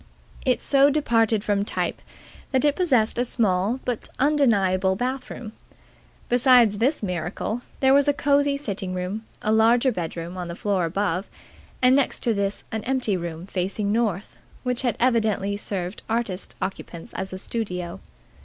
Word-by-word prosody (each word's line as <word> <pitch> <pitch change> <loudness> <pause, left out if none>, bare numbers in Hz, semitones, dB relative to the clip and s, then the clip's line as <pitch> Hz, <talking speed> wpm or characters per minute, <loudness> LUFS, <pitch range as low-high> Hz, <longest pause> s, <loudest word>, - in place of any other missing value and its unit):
It 255 - +2
so 275 0 +5
departed 230 -7 +2
from 205 -2 +1
type - - -2 0.5
that 260 +2 +2
it 290 -1 +3
possessed 250 -11 +2
a - - +3
small 215 -1 +1
but 245 -3 -3
undeniable 200 -10 +3
bath 255 +5 -3
room. 220 -4 -7 0.8
Besides 245 -4 +5
this 260 +2 +1
miracle, 180 +5 -3 0.2
there 265 0 +5
was 280 0 +5
a 290 - +4
cosy 285 0 +2
sitting 195 -8 -4
room, 185 +4 -3 0.2
a 215 - +1
larger 235 +4 +4
bedroom 170 -2 -5
on 180 -1 -4
the 170 - -6
floor 195 -2 0
above 185 +2 -1 0.6
and 255 +1 +6
next 280 -2 +1
to 235 - +2
this 200 -1 -1
an 220 -1 -3
empty 255 -6 0
room 170 -1 -5
facing 200 +2 -2
north, 215 -4 -1 0.3
which 250 -1 -1
had 245 -2 0
evidently 220 -5 +1
served 195 -2 -4
artist 220 -5 -2
occupants 185 0 -6
as 190 0 -4
a 185 - -5
studio. 185 -4 -4
215 Hz, 155 wpm, -24 LUFS, 190-250 Hz, 0.8 s, and